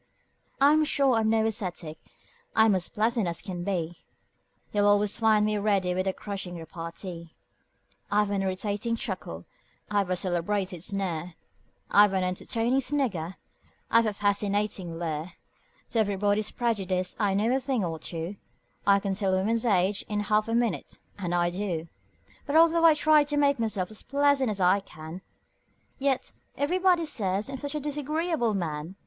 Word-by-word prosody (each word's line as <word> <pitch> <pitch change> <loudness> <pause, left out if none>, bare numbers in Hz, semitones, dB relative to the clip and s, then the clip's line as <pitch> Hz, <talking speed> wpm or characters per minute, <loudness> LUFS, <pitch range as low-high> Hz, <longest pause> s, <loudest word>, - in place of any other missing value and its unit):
I'm 295 +3 +5
sure 275 -3 +2
I'm 220 -1 +2
no 220 0 +2
ascetic: 180 -8 -2 0.6
I'm 220 -1 +5
as 185 -2 -1
pleasant 225 -1 +1
as 170 -1 -2
can 180 -3 -5
be; 175 -3 -2 0.8
You'll 205 -1 +3
always 205 +1 +3
find 215 -2 +4
me 210 -1 0
ready 200 -3 +1
with 185 +1 -1
a - - +3
crushing 195 -3 -5
repartee; 165 +1 -8 0.8
I've 205 0 +2
an 200 -1 0
irritating 205 +4 -1
chuckle; 180 - -5 0.5
I've 200 -3 +1
a 185 - +1
celebrated 180 0 -1
sneer; 180 -3 -2 0.6
I've 205 -1 +6
an 190 -1 +1
entertaining 225 +7 0
snigger; 235 - -1 0.6
I've 230 0 +5
a 210 - -1
fascinating 205 -3 0
leer; 165 +1 -4 0.6
To 230 - +1
everybody's 205 0 +1
prejudice 190 -6 -1
I 200 -3 +1
know 225 +5 +2
a - - +1
thing 260 -6 -1
or 165 -2 -4
two; 170 +4 -5 0.5
I 200 0 +6
can 195 -1 -2
tell 190 -1 +1
a - - +2
woman's 225 +5 +1
age 195 -1 +2
in 210 -1 -1
half 210 +1 +1
a 225 - 0
minute 235 -2 -1 0.2
and 175 -2 -2
I 175 0 +2
do 180 -4 -3 0.6
But 285 - -1
although 330 +1 +5
I 320 -2 +7
try 305 0 +5
to 295 0 -2
make 280 -2 +3
myself 215 -4 -1
as 215 - -7
pleasant 280 -2 +2
as 205 -2 -3
I 185 +2 +4
can, 165 -2 -10 0.8
Yet 270 -1 0 0.3
everybody 355 +3 +2
says 205 -3 -1
I'm 265 - -5
such 285 +2 -4
a - - 0
disagreeable 295 -3 -1
man! 165 -1 -4
205 Hz, 160 wpm, -27 LUFS, 185-235 Hz, 0.8 s, I